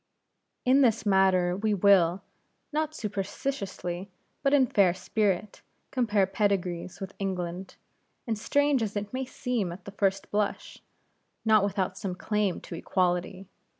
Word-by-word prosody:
In 260 +2 +5
this 230 -4 +3
matter 190 -3 +3
we 210 +2 0
will 190 -2 +4 0.5
not 310 0 -1
superciliously, 195 -3 -4 0.3
but 275 - +2
in 280 -2 +5
fair 195 -6 +3
spirit 205 -1 -1 0.3
compare 215 -6 +2
pedigrees 185 -3 -1
with 195 -1 -6
England, 185 -1 -4 0.5
and 230 - -1
strange 285 +4 +2
as 215 -2 -2
it 205 +2 -4
may 260 +1 -2
seem 245 -7 -2
at 180 +1 -10
the 200 - -7
first 195 -1 -1
blush, 205 0 -2 0.7
not 215 -2 +5
without 195 -2 -1
some 190 -4 -3
claim 210 -1 -1
to - - -9
equality. 180 +2 -1
200 Hz, 135 wpm, -28 LUFS, 185-220 Hz, 0.7 s, In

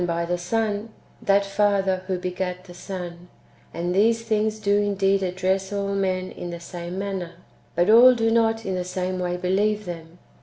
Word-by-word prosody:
by 170 0 -1
the 175 +1 0
Son 210 +4 -1 0.3
that 200 0 +3
Father 195 -2 +1
who 190 -2 -1
begat 180 0 -4
the 180 -2 -12
Son: 175 -1 -7 0.4
and 175 +2 -2
these 225 +4 +3
things 220 -1 0
do 205 -1 +2
indeed 195 -1 +2
address 190 +1 -1
all 200 -1 -2
men 185 -1 -1
in 175 - -7
the 170 0 -6
same 175 +1 -7
manner, 190 -3 -4 0.4
but 175 +1 +2
all 240 +4 +8
da 225 -1 +1
not 225 -1 +2
in 190 - -2
the 180 -1 -1
same 185 0 -3
way 180 0 -1
believe 205 +4 0
them. 165 -1 -8
190 Hz, 180 wpm, -24 LUFS, 180-205 Hz, 0.4 s, all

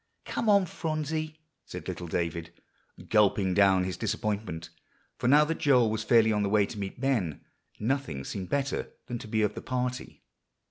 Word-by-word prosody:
"Come 225 - -1
on, 200 -2 +5
Phronsie," 155 -1 -3 0.3
said - - -8
little 90 - -5
David, 85 0 -2 0.6
gulping 100 -3 +3
down 95 -1 +4
his 90 0 -3
disappointment; 100 -6 -3 0.5
for - - 0
now 150 +3 +6
that 165 +1 -3
Joel 125 -6 +4
was 110 0 -2
fairly 110 -1 +4
on 105 - +1
the 100 - 0
way 105 0 +4
to 105 - -8
meet 100 +3 -5
Ben, 115 - 0 0.4
nothing 120 - -1
seemed 95 +5 -5
better 140 -1 -1
than 120 -1 -5
to - - -9
be 110 0 +1
of 105 -1 +1
the - - -7
party. 125 0 -4
110 Hz, 175 wpm, -28 LUFS, 95-135 Hz, 0.6 s, now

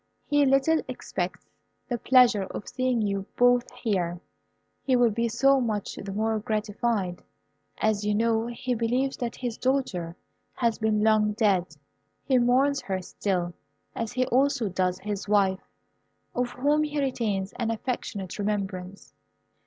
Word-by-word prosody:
He 290 -1 +3
little 275 +4 +3
expects - - -4 0.4
the 240 -2 -2
pleasure 245 -5 +5
of 205 - -7
seeing 255 -3 0
you 200 -1 -2
both 245 0 +4
here. 190 -8 -2 0.6
He 260 - +2
will 245 -2 +4
be 230 +2 0
so 275 +4 +4
much 215 -4 -2
the 200 - -7
more 220 +2 0
gratified, 210 -3 -1 0.6
as 215 -1 +1
you 210 0 +1
know 225 +1 +1
he 245 +1 -3
believes 245 +4 0
that 240 -2 -3
his 240 -3 -4
daughter 200 -11 -1 0.4
has 235 -2 0
been 215 -1 +1
long 215 -1 +3
dead. 190 -7 +1 0.5
He 260 -2 +3
mourns 265 +4 +3
her 190 -1 -2
still, 180 -2 -2 0.4
as 230 0 -4
he 255 0 +1
also 255 -3 +2
does 185 0 0
his 205 -1 -5
wife, 195 -2 +2 0.7
of 245 0 0
whom 290 +4 +2
he 300 -1 -1
retains 215 -8 -1
an 235 -2 -1
affectionate 220 -5 -4
remembrance." 195 -2 -3
225 Hz, 145 wpm, -27 LUFS, 200-250 Hz, 0.7 s, pleasure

